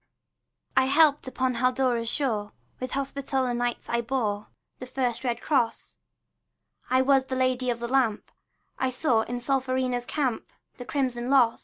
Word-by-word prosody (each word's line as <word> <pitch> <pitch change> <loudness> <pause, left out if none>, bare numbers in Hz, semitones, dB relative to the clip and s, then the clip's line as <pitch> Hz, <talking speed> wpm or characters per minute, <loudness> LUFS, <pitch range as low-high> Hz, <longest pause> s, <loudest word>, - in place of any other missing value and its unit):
I - - +5
helped 290 0 +4
upon 260 0 0
Haldora's 250 -2 +1
shore; 215 -8 -1 0.3
With 255 0 -5
Hospitaller 270 -2 -1
Knights 240 0 -2
I 235 0 0
bore 225 -4 -2 0.3
The 255 - -7
first 250 -2 -1
red 240 -2 -1
cross; 240 -6 0 0.9
I 255 +1 +4
was 270 -1 +4
the 260 - -3
Lady 255 -1 +1
of 235 -1 -1
the 235 - -3
Lamp; 245 -4 +1 0.5
I 260 - +1
saw 255 -3 +2
in 245 +2 -4
Solferino's 255 -1 0
camp 260 -7 -2 0.3
The 245 - -8
crimson 255 -3 -1
loss. 250 -4 +4
255 Hz, 150 wpm, -27 LUFS, 240-265 Hz, 0.9 s, I